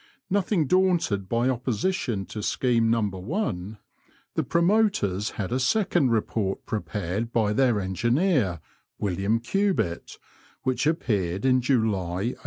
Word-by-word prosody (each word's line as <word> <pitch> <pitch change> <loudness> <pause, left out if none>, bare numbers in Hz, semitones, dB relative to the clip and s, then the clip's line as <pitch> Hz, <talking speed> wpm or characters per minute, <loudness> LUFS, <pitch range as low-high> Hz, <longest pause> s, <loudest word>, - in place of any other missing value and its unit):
Nothing 195 -4 +1
daunted 170 - +1
by 120 +2 +1
opposition 125 - -1
to 105 +4 -6
scheme 115 +1 +1
No. 115 -1 +2
1, 100 - -3 0.6
the - - 0
promoters 170 - +1
had 100 -1 -3
a 125 - +1
second 175 - +2
report 110 -3 -1
prepared 100 +2 -3
by 110 -3 +1
their 120 -2 +3
engineer, 115 - +1 0.4
"William 100 +3 0
Cubitt, 120 - -1 0.5
which 130 +1 0
appeared 100 - 0
in 130 -1 +4
July, 110 -4 0
1820. - - -12
115 Hz, 120 wpm, -26 LUFS, 100-140 Hz, 0.6 s, in